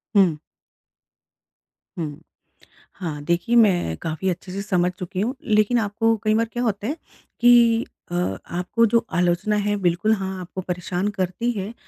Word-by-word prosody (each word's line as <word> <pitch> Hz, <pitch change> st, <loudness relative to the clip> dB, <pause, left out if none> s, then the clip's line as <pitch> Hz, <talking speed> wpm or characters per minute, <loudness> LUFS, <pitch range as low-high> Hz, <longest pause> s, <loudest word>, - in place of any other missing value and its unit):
हुँ। 185 Hz, -6 st, +5 dB, 1.6 s
हुँ। 150 Hz, -1 st, -5 dB, 0.7 s
हाँ, 160 Hz, -6 st, -5 dB
देखिए 175 Hz, +9 st, 0 dB
मैं 180 Hz, -, +4 dB
काफ़ी 165 Hz, +4 st, -2 dB
अच्छे 180 Hz, +1 st, -5 dB
से 200 Hz, +1 st, -4 dB
समझ 180 Hz, -3 st, +1 dB
चुकी 185 Hz, +1 st, -3 dB
हूँ। 250 Hz, +5 st, -1 dB
लेकिन 215 Hz, +2 st, +3 dB
आपको 225 Hz, +2 st, +1 dB
कई 215 Hz, 0 st, +2 dB
बार 230 Hz, +1 st, +2 dB
क्या 240 Hz, +1 st, -1 dB
होता 210 Hz, -1 st, -1 dB
है 300 Hz, +4 st, -2 dB, 0.4 s
कि 235 Hz, -1 st, +5 dB, 0.3 s
अ, -, -, -2 dB, 0.3 s
आपको 180 Hz, +7 st, +1 dB
जो 235 Hz, 0 st, +3 dB
आलोचना 175 Hz, +4 st, +1 dB
है, 205 Hz, 0 st, +1 dB
बिल्कुल 185 Hz, +4 st, +2 dB
हाँ, 190 Hz, -1 st, -4 dB
आपको 185 Hz, +1 st, -6 dB
परेशान 180 Hz, +2 st, -2 dB
करती 190 Hz, +6 st, -1 dB
है 205 Hz, +1 st, -5 dB
195 Hz, 150 wpm, -23 LUFS, 175-225 Hz, 1.6 s, हुँ